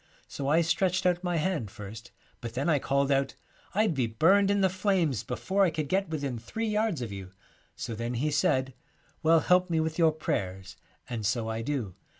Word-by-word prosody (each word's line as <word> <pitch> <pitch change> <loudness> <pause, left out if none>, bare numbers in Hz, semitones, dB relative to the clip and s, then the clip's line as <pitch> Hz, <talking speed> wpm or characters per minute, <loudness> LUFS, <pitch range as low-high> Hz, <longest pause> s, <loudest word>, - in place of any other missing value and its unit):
' - - -31
So 140 - -5
I 160 +4 +4
stretched 180 +3 +1
out 180 0 +2
my 175 -1 0
hand 155 - -1
first, 105 +3 -9 0.3
but 115 -1 -7
then 140 +6 0
I 150 -3 +3
called 140 +1 +1
out, 135 0 +1 0.4
"I'd 215 -3 +3
be 130 -5 0
burned 190 - +4
in 200 0 +2
the 190 - +5
flames 185 - +1
before 195 +1 0
I 185 - +4
could 155 -2 -3
get 190 +3 0
within 140 -6 -3
three 220 - -4
yards 210 - 0
of 115 - -5
you." 95 -2 -7 0.5
So 115 - -5
then 115 +2 -3
he 150 +6 0
said, 135 -3 +1 0.3
" - - -36
Well, 165 0 +5
help 180 +3 +3
me 165 -1 +1
with 160 +1 -2
your 165 -1 +5
prayers," 95 -10 -3 0.3
and 120 -3 -4
so 115 +2 0
I 110 0 -2
do. 115 -7 -3
150 Hz, 210 wpm, -28 LUFS, 120-180 Hz, 0.5 s, the